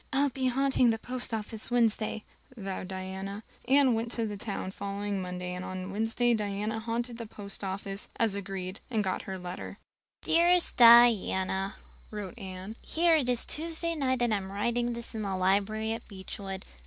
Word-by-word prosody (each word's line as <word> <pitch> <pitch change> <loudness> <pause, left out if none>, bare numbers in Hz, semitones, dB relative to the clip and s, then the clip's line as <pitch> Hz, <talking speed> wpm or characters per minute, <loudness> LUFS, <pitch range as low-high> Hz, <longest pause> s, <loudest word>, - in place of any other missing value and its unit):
"I'll 280 +1 +3
be 260 0 -1
haunting 265 -1 +3
the 225 - +2
post 250 +2 -4
office 220 0 -3
Wednesday," 225 -3 +1 0.3
vowed 195 -3 -4
Diana. 190 +2 -5 0.2
Anne 270 -1 +5
went 230 +1 -1
to 220 -3 -1
town 200 -2 -4
the 190 - -11
following 200 0 -3
Monday 180 0 -4
and 180 0 -5
on 185 +1 -5
Wednesday 225 +3 +2
Diana 210 +1 -1
haunted 235 +1 -3
the 230 - -5
post 200 -1 -7
office, 195 +1 -4
as 225 -3 +2
agreed, 195 -1 -4
and 220 -4 +1
got 190 -1 -1
her 190 - -3
letter. 180 0 -7 0.5
"Dearest 345 +1 +4
Diana" 215 -5 +6 0.3
[wrote 210 +2 -6
Anne], 190 +2 -7
"Here 335 0 +3
it 275 -5 +1
is 245 -2 0
Tuesday 335 +1 -1
night 260 -5 +1
and 235 -2 +2
I'm 195 -2 -2
writing 235 +4 0
this 235 0 -3
in 220 - -3
the 195 -2 -1
library 205 +4 +1
at 230 - -7
Beechwood. 195 0 -7
215 Hz, 170 wpm, -30 LUFS, 195-240 Hz, 0.5 s, Diana